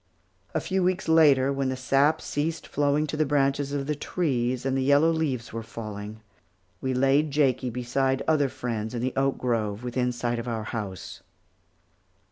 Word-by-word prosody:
A -, -, +3 dB
few 190 Hz, +5 st, -1 dB
weeks 185 Hz, +1 st, 0 dB
later, 145 Hz, -4 st, +5 dB
when 135 Hz, -1 st, -1 dB
the 130 Hz, -, -1 dB
sap 135 Hz, +4 st, +2 dB
ceased 155 Hz, +3 st, -2 dB
flowing 145 Hz, +1 st, +1 dB
to 150 Hz, -, -4 dB
the 155 Hz, -, +2 dB
branches 140 Hz, -1 st, +1 dB
of 140 Hz, -1 st, -2 dB
the 150 Hz, -, -1 dB
trees, 130 Hz, -6 st, -1 dB
and 135 Hz, 0 st, 0 dB
the 135 Hz, -, +1 dB
yellow 145 Hz, +4 st, +4 dB
leaves 140 Hz, -9 st, -2 dB
were 115 Hz, -, -3 dB
falling, 110 Hz, -1 st, -7 dB, 0.6 s
we 130 Hz, -, -1 dB
laid 135 Hz, +4 st, +3 dB
Jakie 135 Hz, -3 st, +1 dB
beside 130 Hz, +3 st, -1 dB
other 150 Hz, -3 st, +3 dB
friends 115 Hz, -2 st, -4 dB
in 120 Hz, -, -2 dB
the 130 Hz, -, -1 dB
oak 135 Hz, 0 st, +1 dB
grove 115 Hz, -3 st, -1 dB
within 125 Hz, 0 st, -1 dB
sight 120 Hz, 0 st, -2 dB
of 115 Hz, -, -6 dB
our 115 Hz, -2 st, -2 dB
house. 105 Hz, -4 st, -6 dB
135 Hz, 175 wpm, -26 LUFS, 120-145 Hz, 0.6 s, later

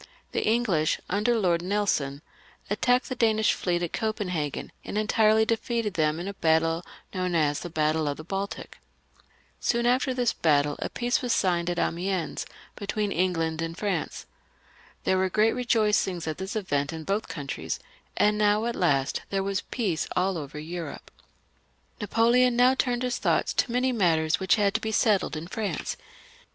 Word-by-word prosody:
The -, -, -1 dB
English, 215 Hz, -9 st, +2 dB
under 215 Hz, +5 st, +2 dB
Lord 175 Hz, -5 st, +2 dB
Nelson, 175 Hz, -7 st, -1 dB, 0.5 s
attacked 245 Hz, +4 st, +2 dB
the 255 Hz, -, -3 dB
Danish 220 Hz, -3 st, +3 dB
fleet 175 Hz, -1 st, -1 dB
at 170 Hz, -, -3 dB
Copenhagen, 180 Hz, -, -2 dB
and -, -, -4 dB
entirely 215 Hz, +1 st, +3 dB
defeated 230 Hz, -2 st, -1 dB
them 155 Hz, -2 st, +1 dB
in 175 Hz, -, -5 dB
a 200 Hz, -, -4 dB
battle 165 Hz, -1 st, +2 dB, 0.3 s
known 185 Hz, -2 st, -1 dB
as 145 Hz, -3 st, +2 dB
the 175 Hz, -, -6 dB
Battle 155 Hz, -1 st, +1 dB
of 145 Hz, -, -2 dB
the 155 Hz, -, -8 dB
Baltic. 195 Hz, +4 st, -5 dB, 0.8 s
Soon 235 Hz, 0 st, +1 dB
after 255 Hz, +2 st, +2 dB
this 250 Hz, -2 st, +1 dB
battle 145 Hz, -2 st, +2 dB
a -, -, -3 dB
peace 245 Hz, 0 st, 0 dB
was 245 Hz, -2 st, 0 dB
signed 175 Hz, -2 st, +1 dB
at 175 Hz, -, -2 dB
Amiens 175 Hz, -1 st, -1 dB, 0.3 s
between 205 Hz, 0 st, -2 dB
England 165 Hz, -3 st, 0 dB
and 165 Hz, +1 st, -4 dB
France. 195 Hz, -6 st, -2 dB, 0.8 s
There 190 Hz, -, +2 dB
were 190 Hz, 0 st, +1 dB
great 215 Hz, +4 st, +3 dB
rejoicings 210 Hz, -7 st, +1 dB
at 155 Hz, -1 st, -4 dB
this 190 Hz, +3 st, -5 dB
event 145 Hz, -9 st, -1 dB
in 160 Hz, -1 st, -6 dB
both 200 Hz, +5 st, -1 dB
countries; 135 Hz, -, -4 dB, 0.4 s
and 210 Hz, 0 st, +3 dB
now, 210 Hz, +1 st, +3 dB
at 235 Hz, 0 st, -1 dB
last, 140 Hz, -6 st, +1 dB
there 195 Hz, -1 st, 0 dB
was 195 Hz, 0 st, -1 dB
peace 195 Hz, -10 st, -2 dB
all 185 Hz, +1 st, +1 dB
over 150 Hz, -2 st, -6 dB
Europe. 165 Hz, +3 st, -6 dB, 0.9 s
Napoleon 235 Hz, +3 st, +3 dB
now 250 Hz, +2 st, +5 dB
turned 250 Hz, -2 st, 0 dB
his 250 Hz, -1 st, -1 dB
thoughts -, -, +1 dB
to 240 Hz, -, +1 dB
many 250 Hz, +2 st, +1 dB
matters 165 Hz, -8 st, +2 dB
which 190 Hz, -1 st, +3 dB
had 205 Hz, -2 st, +2 dB
to 225 Hz, -, 0 dB
be 220 Hz, -, -2 dB
settled 210 Hz, -5 st, +2 dB
in 155 Hz, -, -6 dB
France. 205 Hz, +3 st, -3 dB
195 Hz, 165 wpm, -27 LUFS, 165-220 Hz, 0.9 s, now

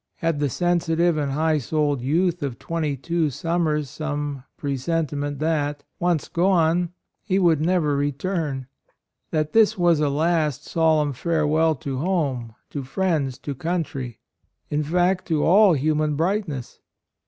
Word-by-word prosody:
Had 165 Hz, -3 st, -1 dB
the 145 Hz, -1 st, +1 dB
sensitive 175 Hz, +1 st, +1 dB
and 145 Hz, -3 st, -1 dB
high 155 Hz, +1 st, +2 dB
souled 145 Hz, -1 st, 0 dB
youth 170 Hz, +6 st, +1 dB
of 140 Hz, -4 st, -3 dB
twenty 155 Hz, -4 st, -2 dB
two 165 Hz, +3 st, 0 dB
summers 155 Hz, 0 st, -1 dB
some 145 Hz, -1 st, -4 dB
presentiment 145 Hz, 0 st, -2 dB
that, 145 Hz, -1 st, -1 dB, 0.2 s
once 175 Hz, -3 st, +1 dB
gone, 175 Hz, -1 st, +2 dB, 0.3 s
he 190 Hz, -3 st, 0 dB
would 170 Hz, -5 st, +3 dB
never 160 Hz, -3 st, +2 dB
return; 145 Hz, -1 st, -2 dB, 0.6 s
that 155 Hz, -1 st, -1 dB
this 220 Hz, -1 st, +4 dB
was 175 Hz, -3 st, +3 dB
a 150 Hz, -1 st, +2 dB
last 150 Hz, -1 st, 0 dB
solemn 155 Hz, -3 st, +2 dB
fare 160 Hz, +3 st, 0 dB
well 160 Hz, +1 st, +3 dB
to 135 Hz, -1 st, -4 dB
home, 140 Hz, -10 st, -1 dB, 0.2 s
to 145 Hz, -, -4 dB
friends, 145 Hz, -3 st, -1 dB
to 145 Hz, -, -5 dB
country, 140 Hz, -6 st, -3 dB, 0.3 s
— -, -, -49 dB
in 150 Hz, 0 st, +1 dB
fact, 180 Hz, +4 st, +1 dB
to 155 Hz, -3 st, +1 dB
all 195 Hz, +2 st, +6 dB
human 150 Hz, +1 st, +1 dB
brightness? 165 Hz, -, -2 dB
155 Hz, 140 wpm, -23 LUFS, 145-170 Hz, 0.6 s, all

